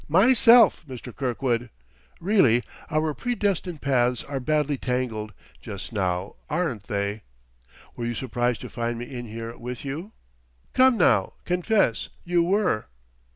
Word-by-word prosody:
"Myself, 230 - +6
Mr. 125 -2 -9
Kirkwood! 125 -2 -1 0.5
Really, 150 - +4 0.3
our 155 -1 0
predestined 195 -7 -2
paths 125 -3 +2
are 140 -1 -4
badly 150 +1 +1
tangled, 125 -5 -2 0.3
just 100 +4 -7
now; 95 -1 -2
aren't 150 - -2
they? 100 +1 -2 0.7
Were 120 - -4
you 120 - -2
surprised 120 -1 -1
to - - -7
find 120 0 -2
me 120 - -5
in 120 -2 -7
here, 115 +1 -6
with 125 +2 -7
you? 160 +10 -5 0.6
Come 260 -2 +5
now, 100 - +3
confess 180 - +1 0.2
you 175 0 +2
were!" 180 - +1
130 Hz, 130 wpm, -25 LUFS, 115-175 Hz, 0.7 s, Myself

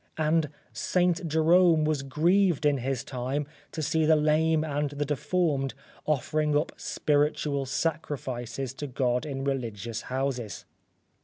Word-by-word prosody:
And 155 0 +2 0.2
St. 180 -1 +1
Jerome 160 +1 +4
was 150 -2 0
grieved 165 +4 +2
in 145 -2 +3
his 130 0 -2
time 130 +3 -3 0.3
to 160 - -4
see 160 +2 +1
the 155 +1 +5
lame 155 +1 +3
and 145 -1 -1
the 145 +1 -3
deformed 145 -1 0 0.3
offering 150 +1 +1
up 150 - 0
spiritual 145 -1 0
sacrifices 135 -4 -3
to 145 +2 -5
God 125 +1 0
in 135 -2 -4
religious 115 -5 -3
houses. 130 -6 -3
145 Hz, 130 wpm, -28 LUFS, 135-155 Hz, 0.3 s, the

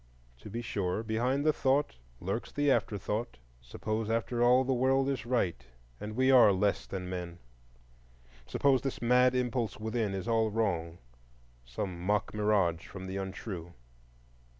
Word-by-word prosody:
To - - -10
be 115 +3 -4
sure, 100 -2 -2
behind 125 +6 0
the 155 - +4
thought 140 - +1 0.2
lurks - - -3
the 145 -1 +2
afterthought,—suppose, 105 - -3
after 115 +1 -1
all, 125 +2 +5
the 130 0 0
World 130 +2 +2
is 135 -4 -3
right 90 - 0 0.4
and 105 +1 -6
we 130 +2 +3
are 125 -5 +8
less 100 +1 0
than 95 -2 -5
men? 90 -2 -5 1.1
Suppose 130 - +2
this 135 0 -3
mad 125 +1 +4
impulse 125 -3 -1
within 110 -2 -1
is 95 +3 -5
all 115 -1 +2
wrong, 90 -7 -1 0.7
some 85 +9 -5
mock 105 +3 0
mirage 105 -6 +1
from 95 -1 -8
the 95 +1 -4
untrue? 95 -3 -6
110 Hz, 145 wpm, -31 LUFS, 95-125 Hz, 1.1 s, are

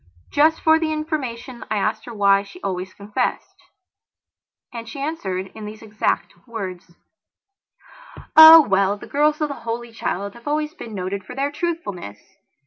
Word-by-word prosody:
Just 315 +2 +3
for 320 0 +4
the 320 -1 -1
information 260 -6 -4
I 215 - 0
asked 210 +2 -1
her 240 - -8
why 200 -1 +4
she 280 - -13
always 185 0 -3
confessed, 210 +6 -3 1.2
and 230 -1 -7
she 250 - -8
answered 195 - -4
in 215 - -9
these 215 +1 -9
exact 215 -1 -2
words: 185 -6 -7 1.4
"Oh, 320 +1 +12
well, 195 +1 +2
the - - -11
girls 300 +2 +1
of 300 - 0
the - - -3
Holy 235 +1 -5
Child 200 -3 -4
have 235 +2 -15
always 300 +1 -1
been 230 - -9
noted 190 +1 -4
for 250 +7 -10
their 280 +2 -1
truthfulness. 290 - -4
230 Hz, 155 wpm, -21 LUFS, 200-300 Hz, 1.4 s, Oh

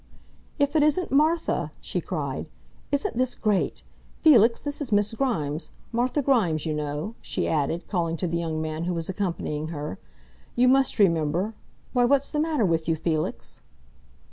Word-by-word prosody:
"If 285 0 +1
it 310 - +5
isn't 305 +5 +2
Martha!" 310 +4 +2
she - - -3
cried. - - -4 0.4
"Isn't 280 -4 -1
this 255 -1 +1
great! 210 -4 0 0.4
Felix, 235 -7 +6
this 290 +1 -5
is 265 -5 -4
Miss 205 +1 +2
Grimes 170 - -1 0.2
Martha 250 +5 0
Grimes, 185 - +2
you 155 - -1
know," 150 +7 -3
she - - -2
added, 160 +2 -1
calling 170 -3 -1
to 180 - -2
the 170 0 -1
young 160 -2 -2
man 155 +1 -3
who 180 0 -1
was 165 +1 -3
accompanying 170 -5 -2
her. 150 - -5 0.6
"You 250 +1 +4
must 265 0 +3
remember 175 +1 +2 0.4
why, 245 -1 +4
what's 280 +2 +2
the 300 - -1
matter 305 -7 +1
with 165 -3 0
you, 165 - +3
Felix?" 155 -1 -3
200 Hz, 165 wpm, -26 LUFS, 160-265 Hz, 0.6 s, Felix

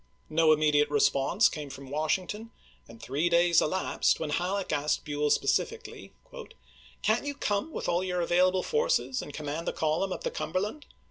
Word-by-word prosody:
No 160 0 +4
immediate 150 -1 +3
response 145 +7 +3
came 150 -3 -6
from 135 0 -10
Wash 155 +3 +1
ington, 210 +5 -8 0.4
and 115 - -14
three 145 +9 -1
days 170 0 +4
elapsed 185 +5 +1
when 155 -2 -3
Halleck 185 +5 -1
asked 145 +1 0
Buell 150 0 -1
specifically: - - -1 0.5
" 65 0 -26
Can't 220 +2 +2
you 285 - -3
come 205 +6 -1
with - - -5
all 175 +1 +1
your 180 -1 -2
available 180 +2 +2
forces 465 - 0
and - - -8
command 150 +2 -5
the - - -1
column 160 +5 0
up - - -5
the - - -2
Cumberland 220 - -3
165 Hz, 175 wpm, -28 LUFS, 145-190 Hz, 0.5 s, No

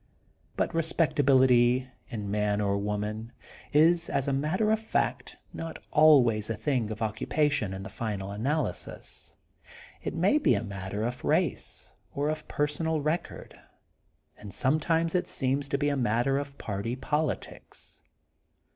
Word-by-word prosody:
But - - 0
respectability, 130 -6 +3 0.2
in 105 -3 -4
man 105 0 +1
or 100 -1 +1
woman, 105 +2 -3 0.4
is, 165 +3 +4
as 140 -1 0
a 140 - +1
matter 160 +10 +1
of 220 - +2
fact, 220 - -2 0.2
not 165 -1 -6
always 125 -9 +5
a 115 - -1
thing 115 0 -1
of 110 +1 -4
occupation 130 +2 0
in 95 0 -6
the - - -6
final 100 -4 -4
analysis. 135 +10 -3 0.7
It - - -4
may 300 - +3
be - - +3
a - - -1
matter 100 0 -4
of 125 +1 -4
race - - -1 0.2
or 145 +1 0
of 155 0 -4
personal 150 +2 -1
record. 155 +4 -3 0.8
And 105 - -9
sometimes 160 - +1
it 180 - +1
seems 135 +1 -1
to 140 - +1
be 145 +1 +1
a 145 - 0
matter 120 +3 +1
of 140 -1 -7
party 105 +3 -3
politics. 150 +2 -4
135 Hz, 140 wpm, -28 LUFS, 110-150 Hz, 0.8 s, always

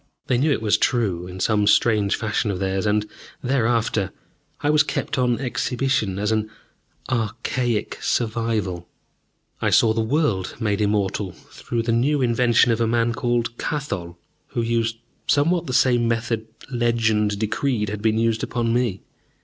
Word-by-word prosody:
They 125 -2 +1
knew 150 +3 +2
it 125 - 0
was 105 - +3
true, 95 -8 0
in 90 +1 -8
some 105 +1 +2
strange 105 -3 +3
fashion 110 -1 -1
of 100 - -1
theirs, 95 +1 -1
and, 105 0 +1 0.4
thereafter, 115 -6 +1 0.5
I 145 - +2
was 150 0 +5
kept 150 - -2
on 125 -2 +2
exhibition 125 -5 -1
as 105 +2 0
an 110 -1 0 0.6
archaic 120 0 -1
survival. 110 -6 -1 0.7
I - - +2
saw 110 -1 +4
the 115 - 0
world 110 - 0
made 105 -2 0
immortal 100 -2 0
through 115 +7 -5
the 115 - 0
new 135 +6 +2
invention 120 -1 +3
of 115 0 0
a 115 - +2
man 115 0 +1
called 120 0 -1
Kathol, 100 - -3 0.3
who 120 - -2
used 115 0 0 0.3
somewhat 165 +4 +2
the - - -3
same 125 -2 +3
method 115 -1 -1 0.2
"legend" 110 -4 +1
decreed 110 +1 -1
had 105 0 -5
been 110 0 +2
used 115 -1 +1
upon 115 -2 -1
me. 120 -6 0
115 Hz, 155 wpm, -23 LUFS, 105-120 Hz, 0.7 s, was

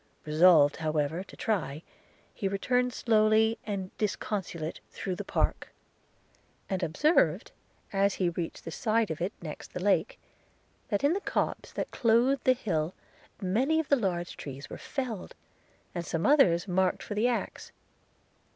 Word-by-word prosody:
– - - -36
Resolved 155 -1 +5
however 155 +2 -1
to - - -15
try, 170 -8 -2 0.5
he 200 - -2
returned 250 +6 +1
slowly 220 -1 +3
and 195 -3 -4
disconsolate 190 -6 -3
through 185 - -4
the - - -5
park; - - -1 1.0
and 190 -1 -2
observed, 300 - +2 0.4
as 200 0 +2
he 180 -2 +1
reached 170 -1 -5
the 165 - -5
side 220 +1 +1
of 160 - -5
it 180 +4 0
next 155 -3 -8
the - - -4
lake, 205 - +1 0.7
that 205 +2 0
in 285 +3 +4
the 395 - -2
copse - - -2
that - - -3
clothed 245 +3 +2
the 255 - +6
hill 175 -9 -2 0.5
many 255 +12 +2
of 320 - -2
the 280 - +6
large 180 -7 -2
trees 140 0 -8
were - - -5
felled, 245 -8 -5 0.6
and 175 - -3
some 165 0 -2
others 200 - +4
marked 185 0 +1
for - - -5
the 215 +4 +2
axe. 245 -2 -3
195 Hz, 150 wpm, -29 LUFS, 170-230 Hz, 1.0 s, the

